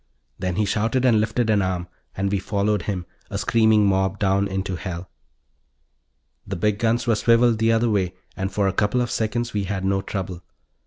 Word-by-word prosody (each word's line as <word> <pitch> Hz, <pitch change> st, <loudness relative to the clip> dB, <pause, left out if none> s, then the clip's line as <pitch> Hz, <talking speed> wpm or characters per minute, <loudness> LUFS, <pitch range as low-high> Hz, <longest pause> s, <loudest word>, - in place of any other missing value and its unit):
Then 90 Hz, -1 st, -2 dB
he 105 Hz, +2 st, +1 dB
shouted 115 Hz, +6 st, 0 dB
and 115 Hz, -4 st, +5 dB
lifted 110 Hz, +1 st, 0 dB
an 105 Hz, -2 st, +3 dB
arm 90 Hz, -2 st, -2 dB, 0.3 s
and 100 Hz, 0 st, 0 dB
we 100 Hz, -, +1 dB
followed 100 Hz, +1 st, 0 dB
him, 90 Hz, -2 st, -3 dB, 0.2 s
a -, -, -3 dB
screaming 110 Hz, -2 st, +3 dB
mob 95 Hz, -1 st, +2 dB
heading 100 Hz, 0 st, +2 dB
down -, -, -2 dB
into 95 Hz, -1 st, -3 dB
hell. 90 Hz, 0 st, -6 dB, 1.4 s
The 100 Hz, -, -3 dB
big 105 Hz, +3 st, 0 dB
guns 115 Hz, +1 st, +1 dB
were 115 Hz, -, +3 dB
swiveled 115 Hz, +1 st, +3 dB
the 115 Hz, 0 st, +3 dB
other 115 Hz, +1 st, +2 dB
way 95 Hz, -4 st, 0 dB, 0.2 s
and 95 Hz, +1 st, -3 dB
for 100 Hz, 0 st, +1 dB
a 95 Hz, -, 0 dB
couple 105 Hz, +5 st, +1 dB
of 120 Hz, -, -2 dB
seconds 120 Hz, +2 st, -1 dB
we 100 Hz, -2 st, -1 dB
had 95 Hz, 0 st, -3 dB
no 95 Hz, 0 st, +1 dB
trouble. 95 Hz, -3 st, -5 dB
100 Hz, 200 wpm, -23 LUFS, 95-110 Hz, 1.4 s, and